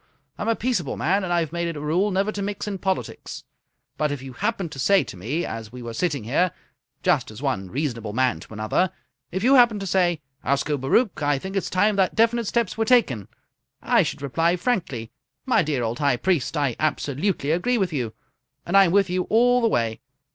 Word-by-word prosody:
I'm - - -3
a 230 - +3
peaceable 220 - -1
man, 190 +6 +1
and 180 - -3
I've 170 -3 +1
made 170 0 -2
it 165 - -4
a - - -5
rule 165 +8 +1
never 195 +2 0
to 205 - -5
mix 200 +1 -4
in 200 -2 -3
politics, 190 +1 -3 0.5
but 150 -1 0
if 145 - -3
you 130 0 -9
happened 200 - -2
to 135 - -8
say 195 +7 +4
to - - -9
me 125 - -2
as 110 -1 -6
we 125 0 -9
were 115 -1 -6
sitting 145 -3 -1
here, 155 +11 +1 0.5
just - - +2
as - - -10
one 95 -1 -1
reasonable 120 - -3
man 125 -5 +1
to 85 - -14
another 110 - 0 0.4
if 190 +2 -3
you 260 +3 +5
happened 240 -5 +6
to - - -3
say, 180 -3 +2 0.2
'Ascobaruch, 145 - +1
I 145 -1 +2
think 190 +8 -6
it's 195 - -1
time 205 +3 +2
that 190 -2 +2
definite 230 0 +2
steps 235 0 -1
were - - +3
taken,' 215 - +2 0.5
I - - +3
should - - -3
reply 165 +5 +1
frankly, 175 - -2 0.3
'My 260 - +3
dear 145 -6 -1
old 115 +1 -2
High 140 -4 +2
Priest, 165 -1 0
I 140 -5 0
absolutely 150 +1 0
agree 240 +10 +1
with 190 -6 0
you, 120 -6 -3 0.5
and 175 - -1
I'm 195 -3 +6
with 195 0 +4
you 180 0 -1
all 245 +3 +4
the 230 - +3
way.' 115 - 0
170 Hz, 210 wpm, -24 LUFS, 135-200 Hz, 0.5 s, happened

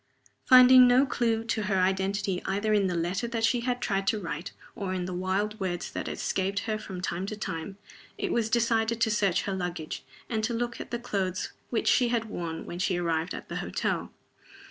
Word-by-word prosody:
Finding 255 0 +9
no 250 +3 +5
clew 230 -4 0
to 230 -1 -1
her 205 -2 0
identity 190 0 0
either 205 +3 0
in 200 -2 +3
the 180 - -1
letter 175 +7 -1
that 230 -1 -3
she 240 +2 +3
had 245 +1 -1
tried 195 -4 -1
to 215 - +2
write 165 -1 -5 0.2
or 190 -2 -3
in 180 -1 -2
the 185 - -4
wild 195 +4 -1
words 180 -3 -3
that - - -4
escaped 195 +1 -1
her 215 -1 -2
from 190 -4 -7
time 180 +1 -2
to 215 - -5
time, 190 -1 -5 0.4
it - - -2
was 225 -2 +1
decided 230 0 +1
to 225 -1 +2
search 195 -3 +2
her 195 - -2
luggage, 175 -4 -4 0.2
and 220 -3 -2
to 235 +1 0
look 240 +1 -3
at - - -8
the 240 - -2
clothes 195 -6 -2 0.2
which 230 - -1
she 250 - +4
had 235 -1 0
worn 170 -6 -5
when 175 - -6
she 185 -1 +1
arrived 165 -1 -1
at - - -8
the - - -5
hotel. - - -2
200 Hz, 210 wpm, -28 LUFS, 185-230 Hz, 0.4 s, Finding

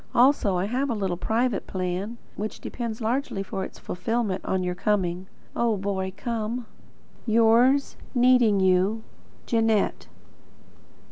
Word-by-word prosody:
Also 240 -7 +4
I 180 - 0
have 255 +6 -1
a 235 - 0
little 190 -4 -1
private 225 +4 0
plan, 185 +5 -3 0.2
which 215 +1 -5
depends 235 -2 -5
largely 230 -3 -1
for 190 0 -4
its - - -8
fulfilment 210 +1 -2
on 190 -1 -1
your 180 0 -1
coming. 185 -1 -1 0.3
Oh, 230 -3 +1
Boy 190 -1 -2
come! 235 0 -3 0.6
Yours, 235 +5 +4 0.2
needing 245 -4 +5
you, 190 +4 +2 0.4
Jeanette. 225 -3 +1
215 Hz, 125 wpm, -25 LUFS, 190-235 Hz, 0.6 s, needing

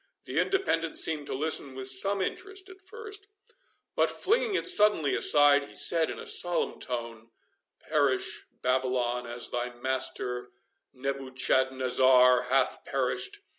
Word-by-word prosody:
The - - -3
Independent 165 - 0
seemed 150 -3 +1
to - - -3
listen 140 -2 -1
with 130 0 -1
some 190 +10 +4
interest 390 - -5
at 380 0 -17
first, 415 -1 -9 0.7
but, - - +2
flinging 455 -1 0
it - - 0
suddenly 210 - +4
aside, 145 -1 +4
he - - -16
said 165 -2 +3
in - - -6
a - - -9
solemn 175 -1 0
tone, 115 -2 -6 0.6
"Perish, 145 -4 -1 0.2
Babylon, 125 -1 -1
as 120 0 -7
thy 120 0 -3
master 125 -1 -2 0.4
Nebuchadnezzar 130 -1 +2
hath 130 0 0
perished! 140 - -3
135 Hz, 130 wpm, -27 LUFS, 125-175 Hz, 0.7 s, some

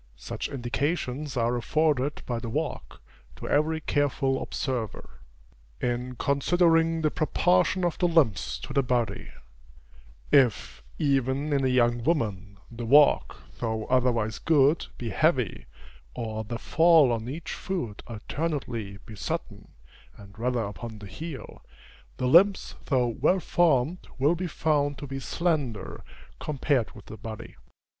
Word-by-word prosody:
Such - - -5
indications 140 +1 -2
are 120 +1 +1
afforded 145 +2 0
by 120 -2 -2
the 115 - -6
walk, - - -4 0.3
to - - -8
every 155 +2 +1
careful 140 -2 0
observer. 125 -6 -4 0.6
In 125 +1 -2
considering 165 +4 +2
the 155 - +2
proportion 180 +2 +2
of 175 - -1
the 180 - +3
limbs 105 - +2
to - - -6
the 140 - +3
body 125 -3 -1 1.0
if, 120 - +3 0.2
even 140 +1 +1
in 140 -1 +1
a - - +3
young 120 -2 +2
woman, 105 - -1
the 120 +1 -7
walk, 145 +3 +4 0.2
though 110 -2 -2
otherwise 120 -4 +1
good, 150 0 +3
be 115 -3 -4
heavy, 130 - +1 0.5
or 110 -2 -4
the 115 +2 -4
fall 160 0 +5
on 115 0 -2
each 160 +4 -6
foot 125 - -4
alternately 120 -4 -4
be 110 - -10
sudden, - - -5 0.5
and 100 +1 -14
rather 120 0 0
upon 110 +2 -7
the 105 - -10
heel, 155 - -8 0.5
the 125 - -2
limbs 185 +9 +5
though 130 -4 +2
well 140 +11 +2
formed, 165 -1 +1
will 145 +4 +3
be 180 +1 -3
found 145 -3 0
to - - -7
be 135 0 -5
slender, 135 - -2 0.4
compared 140 -4 0
with 105 - -13
the 110 - -9
body. 110 +1 -8
130 Hz, 135 wpm, -27 LUFS, 115-155 Hz, 1.0 s, fall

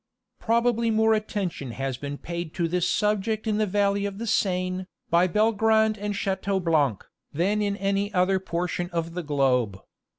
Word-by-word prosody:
Probably 235 0 +2
more 220 0 +3
attention 195 - -3
has 135 0 -3
been 145 +2 -6
paid 170 0 -6
to 170 -2 0
this 180 +1 0
subject 210 +1 0
in 215 -1 0
the 215 - +2
valley 200 +1 +1
of 200 -1 -7
the 230 - -4
Seine, 185 -3 0 0.2
by 170 +2 +4
Belgrand 220 +2 +3
and 205 0 -3
Chateaublanc, 180 - 0 0.3
than 195 +7 +1
in 200 -1 -1
any 200 +1 0
other 190 0 +2
portion 175 -1 -3
of 165 -1 -3
the 180 - -3
globe. 130 - +1
190 Hz, 160 wpm, -25 LUFS, 170-210 Hz, 0.3 s, by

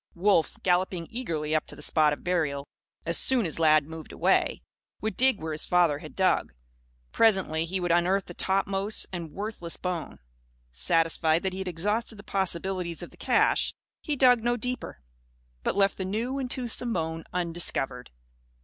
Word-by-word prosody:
Wolf, 180 -2 +2
galloping 180 -2 +1
eagerly 160 -11 -3
up 155 - +1
to - - -8
the - - -8
spot 155 -2 +3
of 145 - -5
burial, 150 -6 -1 0.4
as 170 0 +1
soon 255 -5 +3
as 165 -1 -1
Lad 155 -2 +5
moved 160 +1 -9
away, - - +1 0.4
would 220 +1 -3
dig 260 -4 +3
where 160 0 -4
his 155 - -2
father 170 -5 +2
had 155 - -11
dug. 190 - +1 0.6
Presently, 190 -8 +2
he 185 +3 -2
would 175 -1 -1
unearth 180 +3 +2
the 175 - -9
topmost 195 +3 0
and 170 -3 -5
worthless 200 -4 -5
bone. 180 -3 -4 0.5
Satisfied 160 - +2
that 190 -1 -1
he 190 - -5
had 190 - -4
exhausted 210 +7 -1
the 205 - -12
possibilities 185 -2 0
of - - -9
the - - -17
cache, - - +2 0.3
he 300 - -2
dug 250 -4 +5
no 240 0 +1
deeper; 250 - -4 0.6
but - - -1
left 195 -1 +3
the - - -1
new 230 +8 -2
and 260 -2 -3
toothsome 245 -1 -3
bone 160 -2 -2
undiscovered. 165 -7 -2
180 Hz, 170 wpm, -27 LUFS, 160-205 Hz, 0.6 s, Lad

